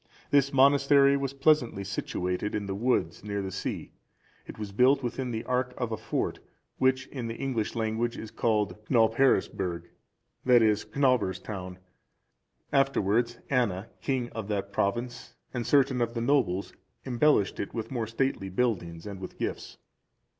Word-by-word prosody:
This 140 -1 +4
monastery 140 +1 +5
was 140 -1 -2
pleasantly 135 -8 +2
situated 95 0 -3
in 105 -1 -2
the 100 - -3
woods, 120 +6 0
near 100 -1 -3
the 95 - -4
sea; - - -4 0.6
it - - -9
was 105 -2 -6
built 130 +6 +4
within 125 +1 -3
the 115 -1 -4
area 125 0 0
of 120 -3 -2
a - - 0
fort, - - -2 0.4
which 130 0 +2
in 125 -4 -5
the 115 - -4
English 120 -4 -2
language 115 +1 -1
is 110 - -7
called 105 -5 0
Cnobheresburg, 110 - +2 0.6
that 125 -2 +6
is, 105 -1 +2
Cnobhere's 120 -4 +1
Town;(381) 95 -3 -7 1.0
afterwards, 120 -2 0
Anna, 110 -6 0
king 130 -3 -1
of 110 -3 -5
that 100 -1 -3
province, 120 +6 -2 0.2
and 120 -2 -3
certain 135 -3 +3
of 120 0 -1
the 115 - -1
nobles, 110 -8 +1 0.3
embellished 125 -4 +2
it - - -4
with 115 +1 -4
more 120 -4 -2
stately 115 -4 -1
buildings 90 -6 -1
and 100 -2 -7
with 95 - -8
gifts. - - -4
115 Hz, 155 wpm, -28 LUFS, 100-130 Hz, 1.0 s, that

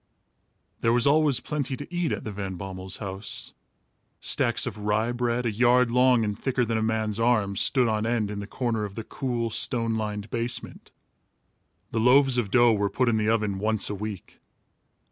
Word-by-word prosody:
There 115 - +2
was 120 -1 +3
always 145 -3 +4
plenty 140 -1 -3
to 145 +5 -10
eat 175 -2 -1
at - - -3
the 110 - -5
Van 95 -2 -5
Bommels' 95 0 -6
house. 100 0 -4 0.7
Stacks - - +2
of 105 - -5
rye 105 +3 0
bread, 120 0 -1
a 115 - +1
yard 120 +2 +3
long 125 -1 +4
and 105 -1 -2
thicker 125 +2 -1
than 115 0 -1
a - - -2
man's 110 -1 -1
arm, 110 -4 +1
stood 125 +5 +3
on 110 0 0
end 115 -3 0
in 105 - -5
the 100 - -6
corner 115 -2 -2
of 100 -1 -6
the 115 - -5
cool, 120 -2 -3
stone 115 0 +1
lined 105 -1 -4
basement. 120 +1 -4 1.0
The 115 - -1
loaves 130 +2 +4
of 110 -4 -2
dough 120 +1 +5
were 100 -1 0
put 125 +2 +1
in 110 - +1
the 105 0 +1
oven 105 -4 0
once 110 0 0
a - - -2
week. 105 -2 -7
115 Hz, 190 wpm, -26 LUFS, 105-125 Hz, 1.0 s, dough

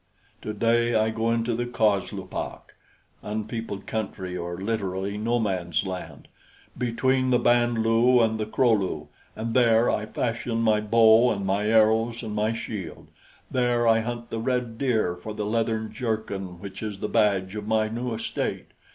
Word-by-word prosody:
Today 115 +2 +1
I 110 0 +2
go 115 +1 0
into 115 +1 0
the 120 +2 -2
coslupak" 105 -5 -2 0.5
(unpeopled 110 -1 -4
country, 95 -4 -4
or 85 0 -4
literally, 100 -2 -2
no 115 +3 0
man's 90 -6 -1
land) 95 -1 -7 0.5
"between 130 +2 +1
the 125 - +4
Band 120 -1 +2
lu 115 +3 +4
and 110 -1 +2
the 110 - -2
Kro 120 +2 +2
lu, 90 -8 -1 0.3
and 115 +1 -3
there 115 -2 +4
I 105 0 -2
fashion 115 0 -2
my 110 -1 +3
bow 115 +2 +5
and 100 -4 -2
my 100 +2 0
arrows 115 +2 +3
and 110 -2 -5
my 105 +1 +1
shield; 105 -6 -6 0.4
there 120 -2 +2
I 115 0 +5
hunt 120 +1 -5
the 115 - -2
red 120 -1 -2
deer 110 -10 +1
for 105 +5 -8
the 105 - -3
leathern 110 0 -1
jerkin 110 -6 -3
which 95 0 -8
is 105 -2 -4
the 105 - -3
badge 100 -3 +1
of 105 -1 -5
my 110 0 +2
new 120 +1 -3
estate. 115 - -3
110 Hz, 160 wpm, -25 LUFS, 105-115 Hz, 0.5 s, bow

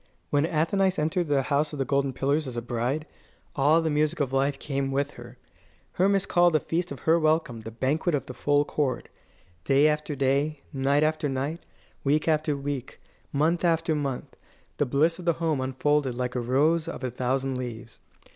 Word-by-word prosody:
When 145 +2 +2
Athenais 185 +4 +1
entered 165 +3 0
the 140 -2 +2
House 145 +3 0
of - - -5
the 135 - -1
Golden 140 +1 +1
Pillars 140 +3 0
as 125 -2 -6
a - - -1
bride, 125 +6 -2 0.5
all 150 +4 +4
the 160 - 0
music 155 +2 +1
of 135 -3 -1
life 135 +1 +1
came 135 -2 -2
with 140 +1 0
her. - - -12 0.5
Hermas 195 +1 +2
called 175 -1 +3
the - - +5
feast 170 +2 -2
of 140 - -7
her 165 +1 +3
welcome 155 -7 +1
"the 110 - -7
banquet 145 +8 0
of 140 - -3
the 125 - -8
full 145 +2 +2
chord." 145 -3 -2 0.5
Day 140 +6 +4
after 150 0 -1
day, 140 +2 0
night 140 +2 +2
after 155 -1 0
night, 140 +5 -2 0.4
week 150 +3 +1
after 155 -2 +1
week, 140 -2 -5 0.3
month 160 +5 +1
after 165 -1 +2
month, 140 -4 -3 0.4
the 145 - +1
bliss 155 +7 +2
of 180 - -8
the 170 - +3
home 160 -4 -1
unfolded 135 0 0
like 125 0 -2
a 125 - -1
rose 150 +7 +2
of 165 - -6
a 130 - -2
thousand 130 +2 -1
leaves. 120 -2 -7
145 Hz, 190 wpm, -26 LUFS, 135-155 Hz, 0.5 s, the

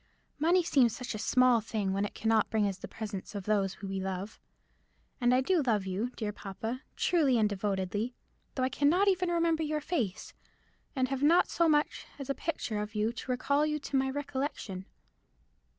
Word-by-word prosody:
Money 345 +4 +4
seems 255 -8 +3
such 250 -2 -5
a 215 - -5
small 250 +1 +4
thing 210 -3 -2
when 200 +1 0
it - - -7
cannot 220 -1 +2
bring 220 -2 +2
us 195 -1 -4
the - - -7
presence 205 -2 -6
of 200 - -4
those 195 -2 0
we 195 0 -3
love. 190 +2 -4 0.8
And 245 0 +4
I 255 +1 +4
do 350 +4 +2
love 220 -7 +1
you, 195 +6 -2
dear 215 -3 -3
papa, 220 +6 -5
truly 295 -8 +3
and 215 -2 +4
devotedly, 205 +3 -2 0.4
though 260 - 0
I 255 - +2
cannot 330 +9 +3
even 365 -2 +1
remember 335 -2 +2
your 305 -1 0
face, 285 - -3 0.6
and 255 -1 +1
have 270 -1 -2
not 330 +5 +5
so 335 -1 +3
much 295 -1 +1
as 275 -1 -4
a - - +1
picture 235 -9 -3
of 210 +1 -6
you 215 +2 +1
to 245 - -8
recall 280 +4 +1
you 300 0 0
to 285 -1 -5
my 265 0 +2
recollection." 270 -9 -4
245 Hz, 190 wpm, -30 LUFS, 210-290 Hz, 0.8 s, not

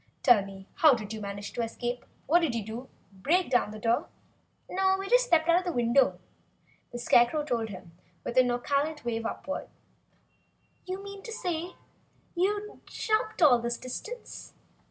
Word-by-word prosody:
Tell 240 -7 +6
me, 195 0 -11
how 305 -5 +7
did 215 -2 -6
you 220 - -6
manage 200 0 -6
to - - -2
escape? 240 +2 -4 0.2
What 335 +5 +5
did 315 -9 0
you 225 -3 -2
do? 235 +4 -7 0.2
Break 295 - +1
down 245 -4 +3
the 215 - -8
door?" 230 +2 +1 0.6
"No 380 +1 +2
we 390 0 -5
just - - +4
stepped 330 -4 +3
out 345 +2 +4
the 355 - -2
window," 245 0 +3 0.7
the 240 - -5
Scarecrow 240 +4 +3
told 235 -6 -1
him 180 -4 -10 0.3
with - - -4
a 255 - +8
nonchalant 280 +4 -1
wave 230 -1 -1
upward. 285 - -5 1.2
"You 375 +2 -4
mean, 400 0 -8 1.1
you 410 +4 -1
jumped 435 -4 -1
all 255 -6 +7
this 235 0 -2
distance?" 435 - -8
250 Hz, 155 wpm, -28 LUFS, 230-350 Hz, 1.2 s, a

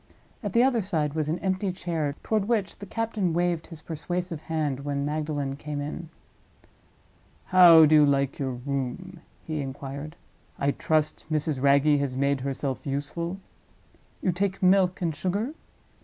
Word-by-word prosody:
At 205 -5 -4
the 235 - +5
other 255 -3 +3
side 155 -6 -1
was 155 -1 -1
an 165 - 0
empty 190 +1 0
chair, 165 -5 -2
toward 215 -3 0
which 215 -4 -1
the 200 - -8
captain 215 -5 -1
waved 175 -1 0
his 160 -2 -11
persuasive 175 0 -4
hand 155 -5 -2
when 140 0 -2
Magdalen 145 -2 -2
came 150 0 -5
in. 150 +3 -5 1.4
"How 175 -3 +8
do 155 - +3
you 150 -1 +7
like 140 -1 +1
your 135 -2 -1
room?" 140 +8 -4 0.3
he 155 -2 -3
inquired; 140 +3 -6 0.4
"I 140 0 +1
trust 155 +1 0
Mrs. 155 -3 0
Wragge 140 +1 +4
has 140 -2 -2
made 140 0 +1
herself 135 0 -3
useful? 155 +6 -3 0.9
You 185 - +3
take 190 +2 -2
milk 185 -1 +3
and 165 -2 0
sugar? 200 - -2
155 Hz, 155 wpm, -26 LUFS, 140-180 Hz, 1.4 s, How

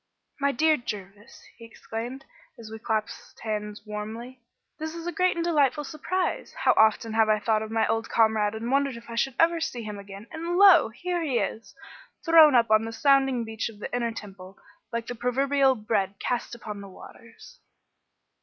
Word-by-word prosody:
"My 280 0 +2
dear 310 +4 +3
Jervis," 205 -3 -9
he 230 - -12
exclaimed, 230 +3 -7 0.3
as 220 -2 -11
we 220 - -7
clasped 220 -1 -4
hands 210 -1 -4
warmly, 220 +4 -7 0.4
"this 315 +1 -5
is 335 0 -7
a 350 - -2
great 365 0 +1
and 335 0 -2
delightful 295 -3 +2
surprise. 340 - -3
How - - +3
often 220 +1 +3
have 220 -1 +3
I 215 - +4
thought 215 0 0
of 220 - -5
my 225 0 +1
old 225 0 -1
comrade 220 -2 +2
and 230 +3 -4
wondered 275 -2 +1
if 235 0 -12
I - - -5
should 260 +2 0
ever 330 0 +3
see 245 -7 -3
him 210 -1 -6
again, 200 +1 -10
and 335 +2 -3
lo! 385 - +7
here 345 +9 -3
he 280 -7 0
is, 220 +1 -4 0.5
thrown 320 -4 +7
up 230 -2 +3
on 215 0 +5
the 225 - -5
sounding 270 -1 +2
beach 220 0 -4
of 220 - -13
the 210 - -5
Inner 235 -1 -1
Temple, 195 -3 -10 0.3
like 235 0 -3
the 245 - -5
proverbial 265 +3 +2
bread 210 -3 -1
cast 240 -1 -3
upon 210 -3 -8
the 200 - -10
waters." 230 - -15
235 Hz, 190 wpm, -26 LUFS, 215-280 Hz, 0.5 s, lo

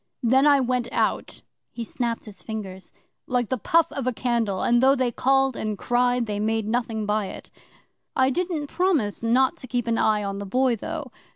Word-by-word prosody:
Then 260 +5 +4
I 285 -1 +6
went 250 -1 0
out' - - -1 0.3
he 235 - -6
snapped 235 0 -3
his 200 -4 -11
fingers 190 -3 -7 0.4
'like 245 -3 0
the 260 - -1
puff 330 +9 +2
of 270 -3 -4
a - - +3
candle, 230 -5 -1
and 240 0 +3
though 270 +1 +5
they 255 -3 0
called 270 +1 +2
and 215 -1 -3
cried, 245 +2 +1
they 205 -2 -3
made 220 0 0
nothing 225 -2 -1
by 210 -1 0
it. - - -10 0.6
I 260 0 +3
didn't 345 -1 -2
promise 300 - 0
not 245 +3 +2
to 255 - -9
keep 245 -1 -1
an 230 -1 0
eye 215 -1 +2
on 200 0 -4
the 200 - -5
Boy, 255 +4 +2
though. 215 - -6
240 Hz, 195 wpm, -24 LUFS, 215-260 Hz, 0.6 s, I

